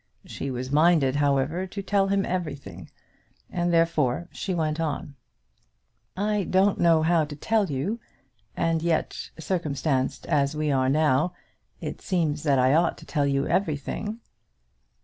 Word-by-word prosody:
She 140 Hz, -, -5 dB
was 130 Hz, 0 st, -4 dB
minded, 150 Hz, -3 st, +4 dB
however, 145 Hz, +5 st, +1 dB
to 200 Hz, +2 st, -6 dB
tell 195 Hz, 0 st, +2 dB
him 195 Hz, 0 st, +1 dB
everything, 140 Hz, -, -5 dB, 0.6 s
and 175 Hz, 0 st, 0 dB
therefore 165 Hz, -2 st, +1 dB
she 195 Hz, -, -4 dB
went 155 Hz, -1 st, -1 dB
on. 160 Hz, -1 st, -3 dB, 1.0 s
"I 210 Hz, +1 st, +1 dB
don't 190 Hz, +3 st, +2 dB
know 165 Hz, -2 st, +4 dB
how 165 Hz, 0 st, +3 dB
to 145 Hz, 0 st, -6 dB
tell 215 Hz, +6 st, +1 dB
you; 150 Hz, -, -2 dB, 0.6 s
and 165 Hz, -1 st, +1 dB
yet, 165 Hz, -1 st, -1 dB
circumstanced 150 Hz, -5 st, -1 dB
as 140 Hz, 0 st, +1 dB
we 150 Hz, -1 st, 0 dB
are 130 Hz, -1 st, +2 dB
now, 150 Hz, +3 st, +2 dB, 0.5 s
it -, -, -5 dB
seems 160 Hz, -5 st, 0 dB
that 145 Hz, -3 st, +2 dB
I 130 Hz, +1 st, +4 dB
ought 165 Hz, +2 st, +2 dB
to -, -, -13 dB
tell 145 Hz, -3 st, 0 dB
you 140 Hz, 0 st, +1 dB
everything." 195 Hz, -, -2 dB
155 Hz, 145 wpm, -26 LUFS, 140-175 Hz, 1.0 s, minded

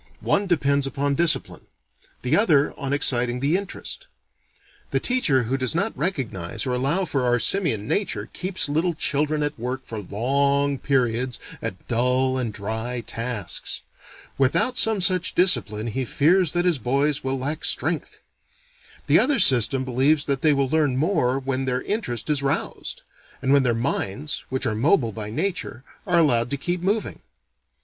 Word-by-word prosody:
One 200 Hz, 0 st, +1 dB
depends 140 Hz, -5 st, +1 dB
upon 140 Hz, +1 st, -1 dB
discipline. 165 Hz, +2 st, 0 dB, 0.6 s
The 125 Hz, -, +2 dB
other 155 Hz, -9 st, +3 dB
on 140 Hz, -2 st, -5 dB
exciting 125 Hz, -3 st, +2 dB
the 140 Hz, +6 st, +1 dB
interest. 200 Hz, -, -5 dB, 0.8 s
The -, -, +1 dB
teacher 150 Hz, -, +1 dB
who 130 Hz, +4 st, -1 dB
does 130 Hz, +2 st, -2 dB
not 200 Hz, +6 st, -1 dB
recognize 135 Hz, -, -2 dB
or 130 Hz, -, -1 dB
allow 140 Hz, +10 st, 0 dB
for 140 Hz, -5 st, -1 dB
our 125 Hz, 0 st, +2 dB
simian 120 Hz, -, +1 dB
nature, 205 Hz, -, -2 dB
keeps 185 Hz, -2 st, -1 dB
little 160 Hz, +4 st, 0 dB
children 150 Hz, 0 st, 0 dB
at 145 Hz, -4 st, -4 dB
work 125 Hz, +3 st, -4 dB
for 110 Hz, -, -6 dB
long 140 Hz, +7 st, 0 dB
periods 125 Hz, -2 st, 0 dB, 0.2 s
at -, -, -6 dB
dull 125 Hz, +2 st, +1 dB
and 120 Hz, -3 st, -2 dB
dry 110 Hz, +4 st, -3 dB
tasks. 115 Hz, -3 st, -4 dB, 0.6 s
Without 140 Hz, -, +2 dB
some 220 Hz, -5 st, +4 dB
such 185 Hz, 0 st, +2 dB
discipline, 120 Hz, -, +2 dB
he 120 Hz, +3 st, -2 dB
fears 165 Hz, +7 st, +2 dB
that 175 Hz, 0 st, 0 dB
his 170 Hz, -6 st, +2 dB
boys 140 Hz, +4 st, 0 dB
will 135 Hz, 0 st, -1 dB
lack 145 Hz, +4 st, -4 dB
strength. -, -, -1 dB, 0.8 s
The -, -, +5 dB
other 275 Hz, +2 st, +4 dB
system 130 Hz, -, +4 dB
believes 135 Hz, +4 st, +2 dB
they 140 Hz, +2 st, +2 dB
will 140 Hz, -1 st, +1 dB
learn 145 Hz, -3 st, +1 dB
more 145 Hz, -5 st, +1 dB
when 135 Hz, 0 st, -2 dB
their 125 Hz, 0 st, -1 dB
interest 160 Hz, -, -3 dB
is 150 Hz, -2 st, +1 dB
roused; 140 Hz, +1 st, -3 dB, 0.4 s
and 135 Hz, +1 st, +1 dB
when 140 Hz, -, +5 dB
their 120 Hz, -3 st, +1 dB
minds, 130 Hz, +3 st, -2 dB
which 130 Hz, 0 st, -1 dB
are 110 Hz, -, 0 dB
mobile 120 Hz, -, +2 dB
by 105 Hz, 0 st, -5 dB
nature, 155 Hz, -, -4 dB, 0.2 s
are 180 Hz, -2 st, +2 dB
allowed 120 Hz, -7 st, +3 dB
to 140 Hz, -, -2 dB
keep 175 Hz, +5 st, -3 dB
moving. 205 Hz, +4 st, -1 dB
135 Hz, 160 wpm, -23 LUFS, 125-160 Hz, 0.8 s, The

